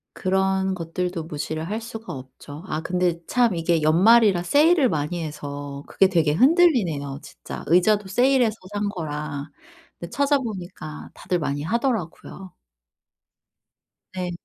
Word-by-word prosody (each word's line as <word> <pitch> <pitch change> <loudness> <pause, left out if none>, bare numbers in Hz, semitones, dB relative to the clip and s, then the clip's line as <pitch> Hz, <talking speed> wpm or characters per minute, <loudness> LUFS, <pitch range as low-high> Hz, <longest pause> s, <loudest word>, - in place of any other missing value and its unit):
그런 190 0 0
것들도 175 0 -3
무시를 155 +1 -5
할 220 +2 -3
수가 225 0 -8
없죠. 135 +4 -10
아 155 -3 -3
근데 175 -1 -1
참 240 -6 +2
이게 165 -1 +1
연말이라 190 +4 +5
세일을 295 - +4
많이 160 +2 -2
해서 145 -2 -7
그게 195 - +3
되게 160 -5 +2
흔들리네요 210 - +3
진짜. - - -9
의자도 195 +3 +3
세일해서 245 +1 +2 0.2
산 205 0 -1
거라. 150 -5 -5 0.5
근데 170 - -7
찾아보니까 215 - -2
다들 180 - -2
많이 145 -2 -2
하더라고요. 195 - -3 1.6
네. 180 -1 -3
180 Hz, 280 characters per minute, -23 LUFS, 155-220 Hz, 1.6 s, 연말이라